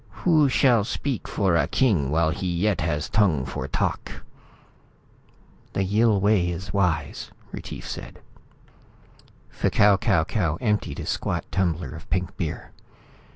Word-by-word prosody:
Who 155 -5 +5
shall 120 -4 +4
speak 130 +2 -3
for 95 -4 +1
a 75 -4 +2
king 95 - +2
while 80 +1 +2
he 90 +2 -3
yet 90 +1 0
has 75 -1 -1
tongue 90 -11 +2
for - - -5
talk?" - - -3 1.5
"The 95 - 0
Yill 105 +2 +3
way 100 -3 +2
is 90 +4 -5
wise," 90 -5 -1 0.2
Retief - - -7
said. - - -7 1.3
F'Kau 105 -2 +3
Kau 95 -8 +3
Kau 85 -3 -1
emptied 105 -3 -1
a - - -6
squat - - -2
tumbler 85 -6 -1
of 80 +2 -11
pink 90 -1 -1
beer. - - -5
95 Hz, 135 wpm, -24 LUFS, 80-105 Hz, 1.5 s, Who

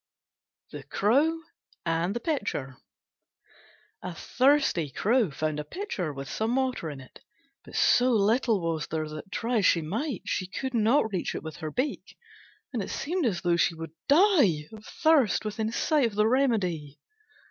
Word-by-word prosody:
THE - - -7
CROW 285 +11 +1 0.5
AND 170 +4 0
THE - - -1
PITCHER 205 - -3 1.3
A 180 -1 -6
thirsty 260 - +2
Crow 220 - +1
found 155 +1 -2
a - - -3
Pitcher 265 - -4
with 135 -1 -7
some 225 - -1
water 260 -11 -1
in 145 -2 -7
it, 130 - -14 0.4
but - - -12
so 250 +1 +4
little 225 -1 +2
was 165 -2 -2
there 155 -1 -3
that, 155 +5 -9
try 235 +5 -1
as 200 - +1
she 165 - +3
might, 220 - -3
she 185 - -2
could 260 +7 -4
not 225 +1 +3
reach 180 - -2
it - - -5
with 160 -1 -7
her 155 - -5
beak, 260 - -3 0.6
and 235 - -1
it - - -5
seemed 335 -1 -1
as 180 -7 -1
though 175 -2 +2
she 170 - +2
would 165 -1 -7 0.2
die 285 - +4
of 215 -1 -11
thirst 300 - +2
within 215 +1 -2
sight 285 +2 +2
of 215 - -8
the 210 +1 +3
remedy. 190 - 0
215 Hz, 170 wpm, -27 LUFS, 165-260 Hz, 1.3 s, so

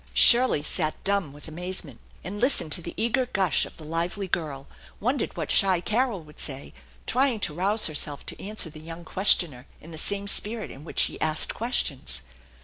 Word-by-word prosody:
Shirley 240 - +8
sat 155 0 -1
dumb 200 -7 0
with 145 +3 -12
amazement, 165 -5 -6 0.2
and 195 +5 -6
listened 250 - +3
to 175 - +5
the 170 - -8
eager 245 +3 0
gush 190 - +1
of - - -16
the 160 - -11
lively 170 +5 -3
girl, 150 -6 -4 0.3
wondered 250 +4 -2
what - - -2
shy 190 -3 +5
Carol 215 -1 -1
would 150 0 -16
say, 135 -2 -3 0.3
trying 255 -2 +1
to 155 - -1
rouse 200 +6 +1
herself 150 -2 -1
to - - -8
answer 200 -5 -4
the 155 - -12
young 165 +1 -10
questioner 160 -8 +2
in 165 - -13
the 160 - -5
same 200 +3 0
spirit 215 +2 0
in 135 - -12
which 160 - 0
she - - 0
asked 155 0 +1
questions. 195 - -2
175 Hz, 185 wpm, -25 LUFS, 155-210 Hz, 0.3 s, Shirley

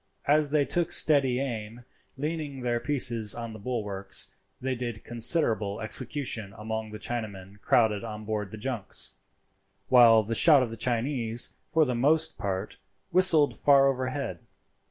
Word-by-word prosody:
As 150 0 +2
they 145 -1 +1
took 175 +2 -1
steady 135 -7 +3
aim, 120 -3 -6 0.3
leaning 150 -2 -5
their 120 -1 -1
pieces 115 -6 +3
on 115 -1 -7
the 110 - -10
bulwarks, 100 -4 -2 0.3
they 130 +1 -3
did 120 -3 -6
considerable 115 -4 +2
execution 115 -3 -2
among 110 +1 -5
the 105 - -8
Chinamen 105 -4 -7
crowded 110 -4 +1
on 110 -1 -8
board 105 -2 -4
the 110 - -10
junks, 115 -2 -3 0.8
while 115 -3 +6
the 115 +3 -4
shot 140 +3 +5
of 120 - -5
the - - -6
Chinese, 120 0 -1 0.2
for 160 -1 +2
the 125 - -2
most 150 +7 +1
part, 95 +1 -4 0.3
whistled 170 -5 +5
far 140 -1 +4
overhead. 130 -7 -3
120 Hz, 145 wpm, -27 LUFS, 110-140 Hz, 0.8 s, while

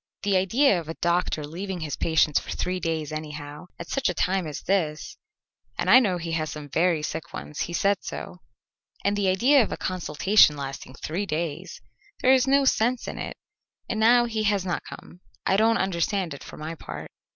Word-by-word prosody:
"The 200 -1 +2
idea 195 +3 +3
of 160 -2 -9
a 165 - -4
doctor 170 -3 0
leaving 180 +4 -5
his 150 -3 -3
patients 160 -2 +2
for - - -12
three 185 0 -2
days 160 -3 -2
anyhow, 150 +1 -7
at 170 - -8
such 275 -1 0
a - - -2
time 185 -2 0
as 150 - -6
this, 160 -6 -1 0.6
and 185 - +1
I 250 - +10
know 195 -8 +1
he 170 -1 -5
has 155 -1 -1
some 150 -1 -8
very 165 0 +1
sick 160 +1 -5
ones; 150 - -7
he 170 - -2
said 200 +3 +2
so. - - -7 0.7
And 200 +1 +2
the 200 -1 0
idea 255 +10 +5
of 225 - -1
a - - -3
consultation 185 -1 +3
lasting 135 -1 -7
three 180 +9 -3
days! 155 -2 -4 0.4
There 260 - +5
is 260 0 +3
no 275 +1 +4
sense 245 -1 +1
in - - -5
it, - - -5 0.5
and 220 - -2
now 240 +2 +5
he 225 -2 -2
has 200 -3 +1
not 175 - -1
come. 175 - -11 0.3
I 190 - +3
don't 225 +2 +4
understand 190 -1 -1
it, 140 - -10
for - - -11
my 155 +2 -5
part." 165 - -8
180 Hz, 200 wpm, -25 LUFS, 155-205 Hz, 0.7 s, I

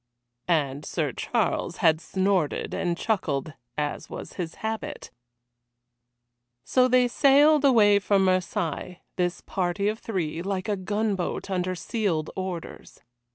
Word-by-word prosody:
And 145 -4 +1
Sir - - -2
Charles - - -1
had 160 0 +3
snorted 190 -5 0
and 175 -2 -1
chuckled, 155 - -1 0.2
as 150 -1 -3
was - - -7
his 170 -3 -5
habit. 220 0 -4 1.5
So 255 -1 +3
they 250 0 +4
sailed 285 +4 +5
away 210 -7 +6
from 195 -1 +2
Marseilles, 180 -2 -1 0.2
this 180 0 -1
party 185 +2 -1
of 215 +1 -1
three, 170 -8 -3
like 195 +2 -3
a 210 - +1
gunboat 200 -1 -2
under 185 0 -1
sealed 175 -5 -1
orders. 185 -3 -6
190 Hz, 120 wpm, -26 LUFS, 170-215 Hz, 1.5 s, away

